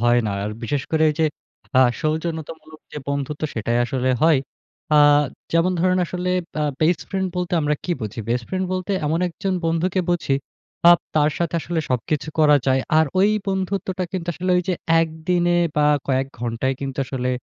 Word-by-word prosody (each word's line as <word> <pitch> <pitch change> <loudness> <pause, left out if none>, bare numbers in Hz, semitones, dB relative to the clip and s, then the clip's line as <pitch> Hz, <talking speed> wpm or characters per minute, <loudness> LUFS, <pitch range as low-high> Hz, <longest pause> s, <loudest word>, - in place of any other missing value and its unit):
হয় 120 0 +4
না। - - -1
আর 105 - -3
বিশেষ 135 +4 -1
করে 160 -1 +2
এইযে 155 +1 +1 0.5
আ - - +7 0.2
সৌজন্যতামূলক 160 0 -4
যে 150 - -5
বন্ধুত্ব 140 +1 -3
সেটাই 115 +1 0
আসলে 130 +1 -1
হয়। 160 -3 +5 0.6
আ - - +6 0.6
যেমন 170 +2 +3
ধরেন 185 +1 +2
আসলে 180 +1 -3 0.3
আ - - +1 0.2
বেস্ট 160 +1 +3
ফ্রেন্ড 190 -1 -1
বলতে 180 +1 -2
আমরা 150 0 +1
কি - - -3
বুঝি? 110 0 -5
বেস্ট 120 0 0
ফ্রেন্ড 190 0 -1
বলতে 185 +2 -2
এমন 160 +2 +1
একজন 190 +3 -3
বন্ধুকে 165 +3 +1
বুঝি 165 -5 +1 0.5
আ - - +10 0.2
তার 150 -1 +3
সাথে 170 -1 -1
আসলে 170 +1 -3
সবকিছু 140 +5 -1
করা 150 -2 +6
যায়। 130 0 +3 0.2
আর 160 - +5
ঐ - - +5 0.3
বন্ধুত্বটা 190 -1 -2
কিন্তু 175 -2 -4
আসলে 185 +3 -3
ঐযে 180 0 -1 0.3
১ 165 - +1 0.2
দিনে 175 -1 +3 0.2
বা 150 - +4 0.2
কয়েক 135 0 +1
ঘন্টায় 120 +3 -1
কিন্তু 135 -1 -5
আসলে 125 -1 -3
160 Hz, 175 wpm, -22 LUFS, 135-180 Hz, 0.6 s, আ